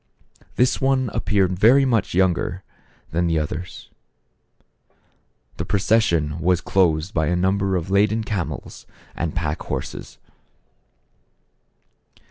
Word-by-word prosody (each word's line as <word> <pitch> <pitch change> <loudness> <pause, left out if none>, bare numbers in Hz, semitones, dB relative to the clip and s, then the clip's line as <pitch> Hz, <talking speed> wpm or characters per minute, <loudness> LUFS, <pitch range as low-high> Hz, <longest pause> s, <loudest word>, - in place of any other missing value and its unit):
This 125 +1 +2
one 135 -2 +1
ap - - -3
peared 95 -3 +1
very 130 +6 +6
much 115 -8 0
younger 90 0 0 0.5
than 85 +2 0
the 80 -1 +1
others. 80 +3 -5 1.7
The - - -2
procession 85 -7 +1
was 90 0 +2
closed 85 -2 +1
by 80 -2 +1
a 90 - +1
number 95 +2 +1
of 90 +1 -3
laden 105 +3 +2
camels 105 -6 -5 0.3
and 80 -1 -3
pack 80 -4 -2
horses. - - -6
95 Hz, 110 wpm, -22 LUFS, 85-105 Hz, 1.7 s, very